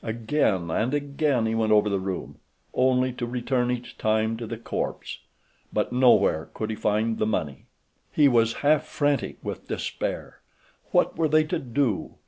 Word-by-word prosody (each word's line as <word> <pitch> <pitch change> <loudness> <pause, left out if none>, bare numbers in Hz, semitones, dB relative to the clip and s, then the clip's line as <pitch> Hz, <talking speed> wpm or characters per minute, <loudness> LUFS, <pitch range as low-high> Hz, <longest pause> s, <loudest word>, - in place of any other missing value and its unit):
Again 110 - 0
and 120 - 0
again 140 -3 0
he 110 - 0
went 110 -1 +1
over 105 0 +5
the 100 -2 0
room, 95 0 -5 0.3
only 130 0 +2
to 120 - -4
return 125 0 -1
each 125 0 -5
time 110 +1 +1
to 115 -1 -6
the 115 - -5
corpse; 115 - -4 0.5
but - - -1
no 125 0 +6
where 80 -6 0
could 110 0 -3
he - - -3
find 110 +2 0
the 110 - +1
money. 75 -10 -3 0.4
He 150 -2 +5
was 115 -3 +3
half 150 0 +4
frantic 145 -1 -1
with - - -6
despair. - - -4 0.5
What - - +2
were 160 - +3
they 155 +1 +4
to 170 +2 -2
do? 125 -4 -1
120 Hz, 170 wpm, -25 LUFS, 110-135 Hz, 0.5 s, no